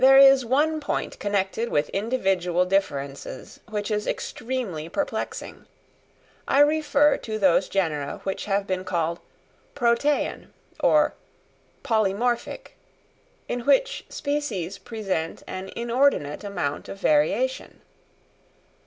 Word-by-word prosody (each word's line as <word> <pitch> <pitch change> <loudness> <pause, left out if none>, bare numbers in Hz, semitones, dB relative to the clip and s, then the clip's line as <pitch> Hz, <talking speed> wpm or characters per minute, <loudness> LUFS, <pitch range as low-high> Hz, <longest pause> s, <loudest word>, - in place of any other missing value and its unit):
There 270 +1 +8
is 270 -1 +8
one 295 +6 +2
point 290 - -3
connected 205 +3 -1
with 150 0 +1
individual 190 -5 +1
differences 140 -9 -3
which 210 0 -3
is 210 0 -1
extremely 225 -11 -3
perplexing: 290 +11 -4 0.8
I 280 - +4
refer 295 -1 +4
to 220 -1 -4
those 190 -2 +3
genera 155 -7 -1
which 195 - -3
have 200 -1 0
been 185 -1 -2
called 170 -2 -1 0.6
"protean" 270 +3 +1 0.3
or - - +4 0.7
"polymorphic," 230 - 0 0.8
in 245 - -2
which 395 - +2
species 225 - -3
present 195 -6 -3
an 190 +1 -6
inordinate 235 - +1
amount 150 -8 -3
of 195 - -7
variation. 200 - +1
210 Hz, 105 wpm, -25 LUFS, 185-260 Hz, 0.8 s, There